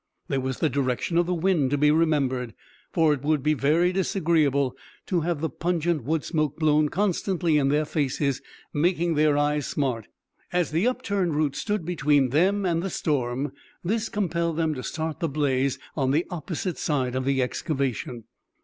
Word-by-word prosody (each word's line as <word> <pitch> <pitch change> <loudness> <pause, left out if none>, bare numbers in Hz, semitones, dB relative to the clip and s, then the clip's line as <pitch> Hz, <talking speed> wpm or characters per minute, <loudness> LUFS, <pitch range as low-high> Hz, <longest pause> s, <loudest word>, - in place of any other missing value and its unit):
There 135 - 0
was 130 -1 -3
the 160 - +2
direction 140 +4 0
of 175 - +1
the 180 - 0
wind 165 -5 +2
to 145 - +1
be 150 +1 +4
remembered, 140 -7 +1 0.4
for 160 -3 +3
it 140 - -4
would 150 -1 +1
be 155 +1 +3
very 155 +5 +2
disagreeable 155 -8 +1 0.3
to 180 -3 0
have 165 -2 -1
the 160 - +1
pungent 170 -3 -1
wood 155 +1 0
smoke 155 -4 -1
blown 155 -1 +3
constantly 180 -4 +1
in 135 - +2
their 150 +2 +2
faces, 140 -2 -1 0.3
making 170 +2 +1
their 150 -1 +3
eyes 145 -1 +1
smart. 125 -7 -2 0.4
As 175 -2 0
the 170 +9 +2
upturned 200 -9 0
roots 150 -2 0
stood 205 -5 -2
between 145 -5 +2
them 190 +8 +2
and 170 -2 +1
the 195 - -2
storm, 135 -4 -1 0.3
this 220 +5 -1
compelled 170 -5 -1
them 160 -2 +1
to 130 - -5
start 160 +3 -4
the 165 -3 -1
blaze 135 -2 0 0.2
on 135 -3 +1
the 150 +6 +2
opposite 175 +1 -4
side 130 -5 0
of 130 0 -1
the 135 0 +1
excavation. 125 -3 -3
155 Hz, 175 wpm, -25 LUFS, 140-170 Hz, 0.4 s, be